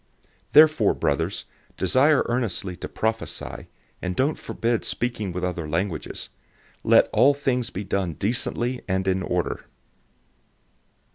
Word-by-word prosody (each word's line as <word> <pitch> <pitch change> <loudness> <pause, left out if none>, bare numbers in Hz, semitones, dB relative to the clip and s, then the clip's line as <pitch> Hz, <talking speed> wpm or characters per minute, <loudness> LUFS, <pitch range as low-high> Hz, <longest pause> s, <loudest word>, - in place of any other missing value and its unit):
014:039 - - -40
Therefore, 150 -7 +6
brothers, - - -1 0.3
desire 140 +3 +3
earnestly 110 -6 -1
to - - -7
prophesy, 110 0 -3 0.3
and 90 -1 -3
don't 140 +4 +1
forbid 115 0 -1
speaking 120 -5 -2
with 90 +1 -4
other 85 -4 -2
languages. 85 +1 -3 0.5
014:040 - - -2
Let - - +7
all 145 - +6
things 130 -4 -1
be 95 - -5
done 95 -3 -1
decently 120 - -1
and 95 0 0
in 95 0 +1
order. 90 -1 -2
110 Hz, 130 wpm, -24 LUFS, 90-125 Hz, 0.5 s, Let